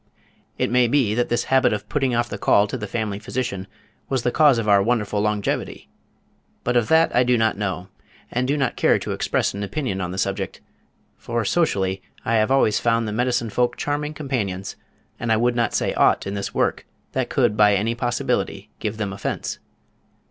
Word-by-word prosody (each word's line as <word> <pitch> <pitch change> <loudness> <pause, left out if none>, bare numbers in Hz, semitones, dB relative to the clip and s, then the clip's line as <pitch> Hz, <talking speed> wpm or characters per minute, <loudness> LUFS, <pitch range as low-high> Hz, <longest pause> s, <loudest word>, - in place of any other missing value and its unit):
It - - 0
may 125 0 +4
be 120 -4 +2
that 120 +2 0
this 120 0 +1
habit 130 -4 +3
of 105 - -4
putting 135 -4 0
off 120 0 +1
the - - -6
call 100 - +4
to 105 - -5
the 110 -4 -4
family 105 -2 -3
physician 110 -4 -4 0.4
was 130 -3 0
the 125 - +1
cause 145 -4 +5
of 115 -2 -2
our 100 -1 +5
wonderful 105 -2 0
longevity, 105 -1 -2 0.7
but 125 - 0
of 120 -3 +3
that 160 +1 +3
I 125 - +5
do 125 0 +2
not 110 0 +2
know, 95 -3 -3 0.4
and 125 +1 0
do 145 +2 +1
not 135 - 0
care - - +3
to - - -5
express - - 0
an 100 - -5
opinion 100 -1 -3
on 90 - -2
the 90 - -6
subject, 95 0 -2 0.6
for 115 +7 -2
socially 95 - +1 0.2
I 115 - 0
have 110 +2 +2
always 135 -5 +3
found 115 -1 +1
the - - -3
medicine 120 -1 0
folk 120 +1 0
charming 150 +1 -2
companions 105 -11 -3 0.4
and 120 - -1
I 110 - +4
would 120 +2 +1
not 120 -1 0
say - - 0
aught - - +3
in 100 - -3
this 100 -1 -3
work - - -1 0.2
that - - -1
could 105 - +2
by 105 -1 +5
any 110 +4 0
possibility 120 0 -2
give 105 0 -3
them 105 -3 -3
offense. 95 - -4
115 Hz, 200 wpm, -22 LUFS, 100-125 Hz, 0.7 s, cause